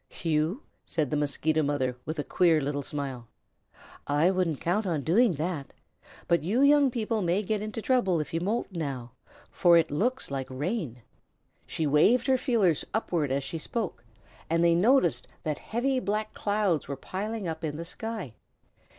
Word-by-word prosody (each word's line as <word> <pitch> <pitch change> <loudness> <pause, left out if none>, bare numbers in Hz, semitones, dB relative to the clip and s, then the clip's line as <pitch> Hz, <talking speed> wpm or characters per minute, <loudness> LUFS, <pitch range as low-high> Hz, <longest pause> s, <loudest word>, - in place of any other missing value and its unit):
"You?" 165 - 0 0.2
said 155 -5 -2
the - - +1
Mosquito 150 +2 +1
Mother, 140 -4 0
with 155 +1 -4
a 145 - -1
queer 165 -1 +3
little 145 0 -2
smile. 135 -4 -5 0.8
"I 150 +6 +3
wouldn't 180 -6 0
count 195 +5 0
on 160 -5 -1
doing 195 - +3
that. 155 -2 -4 0.5
But 170 - +3
you 220 - +1
young 285 -1 +6
people 225 -2 -1
may 180 +3 +1
get 210 +1 -1
into 215 +1 -5
trouble 215 -10 +2
if 150 - -5
you 165 - 0
moult 210 +4 -1
now, 135 -8 -4 0.4
for 175 -1 +5
it 165 -2 +2
looks 235 - -1
like 135 -1 -3
rain." 140 - -3 0.6
She 160 - -2
waved 180 - +4
her 260 0 +3
feelers 210 - +2
upward 170 -10 0
as 140 +1 0
she 160 +4 -5
spoke, 185 - -4 0.5
and 165 +1 +2
they 170 0 +5
noticed 195 - +3 0.2
that 155 -2 -2
heavy 255 +3 -1
black 215 +1 -2
clouds 205 -7 0
were 140 0 -4
piling 205 +6 -4
up 160 0 -5
in 150 -1 -3
the 170 - -5
sky. 220 - -5
170 Hz, 170 wpm, -28 LUFS, 150-215 Hz, 0.8 s, young